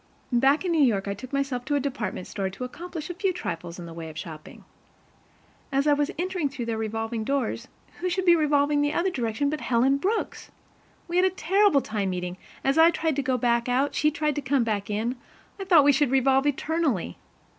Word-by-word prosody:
Back 270 +8 +3
in 355 - 0
New 325 -2 +3
York, 210 -8 +2
I 200 - -1
took 235 +6 -10
myself 275 -3 -1
to 290 - 0
a - - +2
department 240 -9 -3
store 195 -2 -3
to 195 +6 -8
accomplish 335 +5 -6
a - - -5
few 370 +2 0
trifles 170 - -5
in 175 - -8
the 165 - -9
way 165 -1 -7
of 155 - -11
shopping. 160 -2 -9 1.1
As 275 +1 +1
I 295 - +5
was 290 0 +1
entering 355 -3 -1
through 270 -4 -5
their 230 -1 -2
revolving 225 +1 -3
doors, 255 -1 -2 0.3
who 365 - -1
should 370 +1 -1
be 345 -1 +7
revolving 295 -2 +2
in - - +3
the 290 0 0
other 365 +2 +1
direction 240 -1 -1
but 305 - -3
Helen 255 +3 +2
Brooks! 410 +9 -2 0.6
We 345 0 -1
had 365 - +5
a - - +4
terrible 375 -2 +3
time 210 -4 -2
meeting, 180 0 -4 0.3
as 275 +3 +2
I 325 +1 +8
tried 325 -3 -1
to - - +2
go 260 -1 0
back 235 0 +1
out, 265 +3 +2
and - - -13
she 300 - +3
tried 300 0 -1
to - - 0
come 265 -1 +1
back 210 -3 -2
in; 225 +5 -2 0.4
I 390 - -4
thought 340 -6 +6
we 285 - +6
should 280 0 +2
revolve 270 +1 +3
eternally. 290 - -1
275 Hz, 225 wpm, -26 LUFS, 225-310 Hz, 1.1 s, I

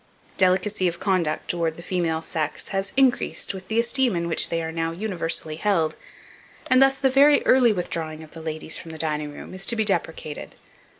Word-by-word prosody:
Delicacy 185 +1 +2
of 175 0 -3
conduct 185 -6 0
towards 165 -2 -1
the 170 - -9
female 170 -3 -1
sex 155 -2 -2
has 195 0 -2
increased 265 -6 +1
with 190 -1 -9
the 220 +1 0
esteem 240 -1 +1
in 170 0 -2
which 165 - +2
they 165 0 -1
are 160 - -4
now 165 0 -2
universally 165 -4 -1
held, 165 -5 +1 0.8
and 255 +1 +6
thus, 270 0 +5
the 265 -1 +2
very 285 +2 +5
early 250 -3 +5
withdrawing 160 -4 -4
of 155 - -14
the 165 - -9
ladies 160 0 -3
from 165 - -9
the 160 - -8
dining 150 -2 -1
room 145 - -10
is 190 +1 -2
to 235 - +4
be 220 -1 0
deprecated. 165 -5 -2
175 Hz, 195 wpm, -24 LUFS, 160-210 Hz, 0.8 s, and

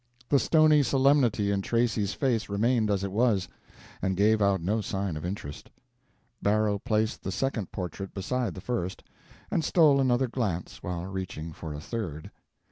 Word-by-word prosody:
The 140 - +5
stony 155 -1 +5
solemnity 130 -6 +3
in 100 -1 0
Tracy's 110 -2 0
face 120 -7 0
remained 110 +2 +1
as 100 -2 0
it 100 - -3
was, 105 -3 +2 0.5
and 95 -1 -1
gave 105 +2 +3
out 100 -1 +3
no 105 +7 0
sign 95 -3 -3
of 75 - -6
interest. 90 -6 -6 0.7
Barrow 105 0 +2
placed 110 +2 0
the 95 - -4
second 110 -1 -2
portrait 95 +1 -5
beside 110 0 -2
the 95 - -8
first, 100 -5 -3 0.5
and 165 - +1
stole 150 -6 +4
another 130 0 +2
glance 105 -9 -3
while 90 0 -4
reaching 95 -4 -5
for 80 -1 -7
a - - -6
third. 80 -4 -5
105 Hz, 160 wpm, -28 LUFS, 95-120 Hz, 0.7 s, The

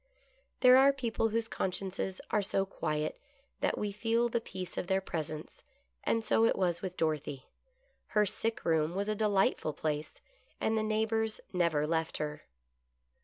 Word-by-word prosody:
There 255 0 +8
are 275 +1 +7
people 235 -4 -1
whose 225 +1 0
consciences 190 -1 -2
are 210 - +3
so 195 -1 0
quiet, 155 -5 -2 0.4
that - - 0
we 210 -1 -1
feel 230 +3 +1
the 235 0 0
peace 185 -4 -6
of - - -3
their 190 +1 +2
presence, 155 -4 -5 0.4
and 225 - +1
so 225 - +3
it 230 - +4
was 175 -2 0
with 185 -2 -5
Dorothy. 150 -4 -1 0.6
Her 210 -1 +3
sick 225 +3 -2
room 160 0 +2
was 200 +1 -1
a - - +2
delightful 200 -7 +2
place, 150 0 -3 0.4
and 220 - +1
the 220 - +2
neighbors 220 0 0
never 170 -5 +2
left 160 +1 -1
her. 150 -1 -4
195 Hz, 160 wpm, -32 LUFS, 160-220 Hz, 0.6 s, There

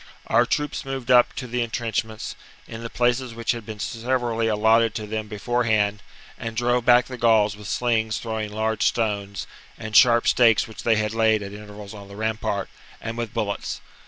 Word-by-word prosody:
Our - - +3
troops 150 -1 -1
moved 135 -2 -3
up 125 -1 +6
to 130 - -5
the 125 0 -2
entrenchments, 110 -1 -3 0.3
in 115 0 -8
the 115 - -5
places 120 0 0
which 115 -1 0
had 115 -3 -6
been 110 -1 -6
severally 115 0 -1
allotted 110 +1 +3
to 110 -2 -4
them 110 0 -4
before 120 +4 -1
hand, 105 -2 +1 0.4
and 115 -1 -5
drove 120 0 +1
back 120 0 +6
the 125 -2 -8
Gauls 110 -3 +4
with 105 0 -10
slings 110 -2 0
throwing 110 -2 -4
large 110 +1 -1
stones 100 -3 -1
^ - - -20 0.2
and 110 -1 -6
sharp 120 -1 +6
stakes 115 -3 +4
which 110 - -9
they 115 -1 +3
had 105 0 -1
laid 110 -2 +2
(at 100 0 -7
intervals 105 -1 -10
on 100 -2 -10
the 100 - -11
rampart, 110 -2 -2 0.3
and 115 0 -5
with 115 -2 -4
bullets. 100 -1 -3
110 Hz, 190 wpm, -24 LUFS, 105-120 Hz, 0.4 s, up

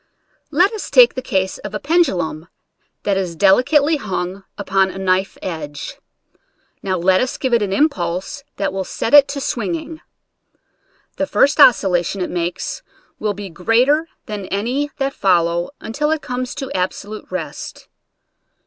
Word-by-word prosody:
Let 355 +8 +3
us 435 - -5
take - - +7
the 255 - -4
case 190 -6 -1
of 210 0 -7
a - - -2
pendulum 190 - 0 0.6
that 200 -2 +1
is 180 -3 -2
delicately 265 - +4
hung 190 -4 -4
upon 195 -1 +1
a 190 - -8
knife 190 0 0
edge. 150 -5 -6 0.8
Now 185 -1 -1
let 185 +2 +3
us 255 - -2
give 260 -3 -1
it 235 - +4
an 200 -2 -1
impulse 195 - -1
that 195 -1 -2
will 195 0 -2
set 225 - -4
it 290 -1 +9
to 280 0 -4
swing 205 -9 -2
ing. 315 - -8 1.2
The 290 - -1
first 285 +2 +2
oscillation 195 - +4
it 180 - -3
makes 175 - -3 0.4
will 210 -1 -1
be 200 -2 -7
greater 250 - +2 0.2
than 205 -3 -6
any 245 +9 -1
that 275 0 -1
follow 175 -4 +1
until 300 +7 -2
it 315 -1 -1
comes 250 0 -4
to 270 0 -5
absolute 200 +3 -3
rest. 165 -6 -6
200 Hz, 155 wpm, -19 LUFS, 185-275 Hz, 1.2 s, it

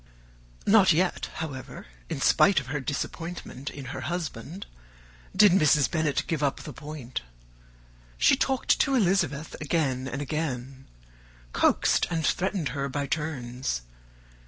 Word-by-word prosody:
Not 200 -4 +6
yet, 180 +3 0
however, 140 -5 -6 0.2
in - - -3
spite 200 -5 +5
of 135 - -8
her 145 +4 -3
disappointment 145 +1 -5
in 140 -2 -8
her - - -5
husband, 170 - -5 0.7
did 205 0 +7
Mrs. 150 -5 +4
Bennet 155 -4 +1
give 160 -3 -2
up 140 -2 0
the - - -8
point. 145 -5 -6 1.0
She - - +5
talked 265 -1 +1
to 275 - +3
Elizabeth 180 - +1
again 135 -4 0
and 135 +1 -4
again; 135 -3 -4 0.7
coaxed - - +3
and 165 -2 -1
threatened 185 -4 0
her 140 -1 -3
by 145 +1 -2
turns. 130 - -3
150 Hz, 130 wpm, -27 LUFS, 135-175 Hz, 1.0 s, did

